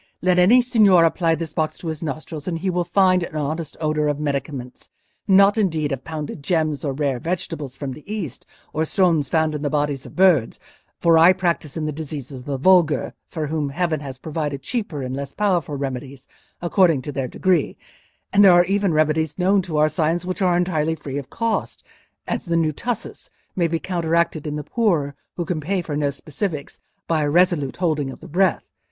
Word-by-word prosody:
"Let 180 Hz, 0 st, +3 dB
any 235 Hz, +8 st, +6 dB
signor 205 Hz, -8 st, +5 dB
apply 165 Hz, 0 st, +2 dB
this 160 Hz, -1 st, -6 dB
box 155 Hz, -1 st, -1 dB
to 170 Hz, -, -8 dB
his 160 Hz, -2 st, -4 dB
nostrils 155 Hz, 0 st, -5 dB
and 170 Hz, -2 st, -1 dB
he 185 Hz, +3 st, -1 dB
will 180 Hz, 0 st, 0 dB
find 185 Hz, +1 st, +3 dB
an 170 Hz, -, -6 dB
honest 155 Hz, +2 st, -3 dB
odour 155 Hz, -1 st, 0 dB
of 145 Hz, -1 st, 0 dB
medicaments—not 150 Hz, -, 0 dB
indeed 160 Hz, -7 st, 0 dB
of 135 Hz, -1 st, -3 dB
pounded 155 Hz, -2 st, -6 dB
gems, 155 Hz, -1 st, 0 dB
or 145 Hz, -, -1 dB
rare 135 Hz, -2 st, -1 dB
vegetables 165 Hz, -4 st, -4 dB
from 140 Hz, -2 st, -4 dB
the 150 Hz, -, -12 dB
East, 180 Hz, -, -5 dB, 0.3 s
or 155 Hz, -, 0 dB
stones 160 Hz, -5 st, +2 dB
found 160 Hz, -1 st, +1 dB
in 150 Hz, -, -4 dB
the 145 Hz, -, -1 dB
bodies 145 Hz, -2 st, -1 dB
of -, -, -14 dB
birds; 175 Hz, -11 st, +3 dB, 0.4 s
for 165 Hz, -1 st, +4 dB
I 170 Hz, +3 st, +7 dB
practise 170 Hz, -5 st, -2 dB
on 155 Hz, -, -2 dB
the 155 Hz, -, -1 dB
diseases 145 Hz, -3 st, -6 dB
of 125 Hz, -, -13 dB
the 140 Hz, -1 st, -2 dB
vulgar, 170 Hz, 0 st, +3 dB, 0.2 s
for 160 Hz, -3 st, -3 dB
whom 150 Hz, -1 st, -2 dB
heaven 160 Hz, +1 st, -1 dB
has 135 Hz, -2 st, -7 dB
provided 145 Hz, -2 st, -4 dB
cheaper 175 Hz, -, -3 dB
and 130 Hz, 0 st, -4 dB
less 140 Hz, 0 st, -6 dB
powerful 180 Hz, -8 st, 0 dB
remedies 135 Hz, -1 st, -5 dB, 0.4 s
according 170 Hz, -6 st, +3 dB
to 145 Hz, -, -5 dB
their 135 Hz, -2 st, -2 dB
degree: 180 Hz, +2 st, 0 dB, 0.6 s
and 200 Hz, +1 st, +6 dB
there 190 Hz, -3 st, +8 dB
are 175 Hz, 0 st, +6 dB
even 195 Hz, -2 st, +1 dB
remedies 155 Hz, 0 st, +1 dB
known 190 Hz, +2 st, +3 dB
to 170 Hz, -4 st, -4 dB
our 155 Hz, +1 st, +5 dB
science 165 Hz, +2 st, 0 dB
which 185 Hz, +2 st, -4 dB
are 180 Hz, -2 st, +3 dB
entirely 160 Hz, -3 st, 0 dB
free 140 Hz, -3 st, -5 dB
of 135 Hz, -1 st, -10 dB
cost—as 230 Hz, +4 st, -4 dB
the 170 Hz, -1 st, 0 dB
new 160 Hz, -2 st, +2 dB
tussis 240 Hz, -, -5 dB, 0.3 s
may 175 Hz, -2 st, +2 dB
be 165 Hz, 0 st, -1 dB
counteracted 170 Hz, -3 st, -1 dB
in 150 Hz, -, -3 dB
the 150 Hz, -, -4 dB
poor, 170 Hz, -12 st, 0 dB, 0.2 s
who 175 Hz, -, -2 dB
can 160 Hz, -2 st, -2 dB
pay 190 Hz, +6 st, -1 dB
for 150 Hz, -3 st, -4 dB
no 145 Hz, -1 st, +1 dB
specifics, 150 Hz, +2 st, -5 dB, 0.3 s
by 160 Hz, -2 st, +1 dB
a 145 Hz, -, +1 dB
resolute 170 Hz, -4 st, +2 dB
holding 155 Hz, -6 st, 0 dB
of -, -, -9 dB
the 170 Hz, -, -11 dB
breath. 180 Hz, +2 st, +1 dB
160 Hz, 200 wpm, -22 LUFS, 145-180 Hz, 0.6 s, there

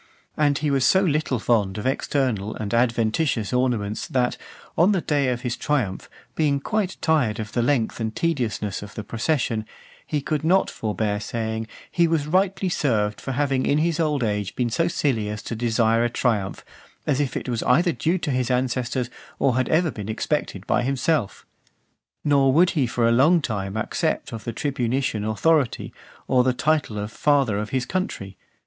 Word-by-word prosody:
And 145 Hz, -2 st, +2 dB
he 150 Hz, -1 st, 0 dB
was 135 Hz, -2 st, +2 dB
so 190 Hz, -, +5 dB
little 155 Hz, -7 st, +1 dB
fond 110 Hz, -4 st, +1 dB
of 105 Hz, -, -5 dB
external 130 Hz, -6 st, 0 dB
and 105 Hz, 0 st, -4 dB
adventitious 115 Hz, 0 st, +1 dB
ornaments, 120 Hz, -5 st, 0 dB
that, 125 Hz, -1 st, 0 dB, 0.4 s
on 180 Hz, +6 st, +4 dB
the 185 Hz, -, +1 dB
day 145 Hz, -4 st, +1 dB
of 125 Hz, -1 st, -1 dB
his 120 Hz, -2 st, -2 dB
triumph, 125 Hz, -11 st, -1 dB, 0.2 s
being 145 Hz, -3 st, +1 dB
quite 195 Hz, +5 st, -2 dB
tired 130 Hz, -9 st, +2 dB
of 105 Hz, -1 st, -5 dB
the 120 Hz, -, 0 dB
length 120 Hz, -3 st, +1 dB
and 110 Hz, -1 st, -3 dB
tediousness 120 Hz, -, -1 dB
of 105 Hz, 0 st, -10 dB
the 110 Hz, -, -5 dB
procession, 115 Hz, 0 st, -1 dB, 0.4 s
he 150 Hz, -, -2 dB
could 150 Hz, +1 st, -2 dB
not 185 Hz, +4 st, +3 dB
forbear 105 Hz, -1 st, -2 dB
saying, 110 Hz, 0 st, -3 dB, 0.2 s
"he 170 Hz, -1 st, +3 dB
was 160 Hz, -3 st, +1 dB
rightly 190 Hz, +4 st, +1 dB
served, 110 Hz, -, 0 dB
for 135 Hz, -, -4 dB
having 135 Hz, 0 st, 0 dB
in 145 Hz, -, +3 dB
his 165 Hz, +1 st, +1 dB
old 150 Hz, -5 st, +1 dB
age 105 Hz, -3 st, -2 dB
been 120 Hz, -2 st, -1 dB
so 165 Hz, +8 st, +1 dB
silly 130 Hz, -, 0 dB
as 105 Hz, 0 st, -5 dB
to 115 Hz, -, -4 dB
desire 115 Hz, 0 st, +2 dB
a 120 Hz, -, +1 dB
triumph; 110 Hz, -5 st, -1 dB, 0.4 s
as 145 Hz, -2 st, +1 dB
if 145 Hz, -3 st, -1 dB
it -, -, -5 dB
was 120 Hz, -3 st, -1 dB
either 170 Hz, +8 st, +3 dB
due 165 Hz, +3 st, 0 dB
to 165 Hz, -4 st, -2 dB
his 125 Hz, -2 st, 0 dB
ancestors, 125 Hz, -1 st, -1 dB, 0.3 s
or 130 Hz, -3 st, +2 dB
had 130 Hz, 0 st, 0 dB
ever 160 Hz, 0 st, +2 dB
been 105 Hz, -3 st, -7 dB
expected 110 Hz, -4 st, -2 dB
by -, -, +2 dB
himself." 135 Hz, -2 st, -1 dB, 0.8 s
Nor 140 Hz, -2 st, +4 dB
would 175 Hz, +6 st, +4 dB
he 140 Hz, -6 st, +1 dB
for 115 Hz, 0 st, +1 dB
a -, -, +4 dB
long 145 Hz, +9 st, +5 dB
time 100 Hz, -7 st, -3 dB
accept 110 Hz, -, -1 dB
of 115 Hz, -, -7 dB
the 115 Hz, -, -2 dB
tribunitian 125 Hz, -3 st, -1 dB
authority, 130 Hz, +5 st, +1 dB, 0.3 s
or 125 Hz, -1 st, +4 dB
the 130 Hz, 0 st, +2 dB
title 145 Hz, -4 st, 0 dB
of 105 Hz, +1 st, -4 dB
Father 135 Hz, -6 st, +2 dB
of 105 Hz, 0 st, -4 dB
his 130 Hz, -2 st, -1 dB
Country. 110 Hz, -, -3 dB
125 Hz, 185 wpm, -23 LUFS, 110-150 Hz, 0.8 s, so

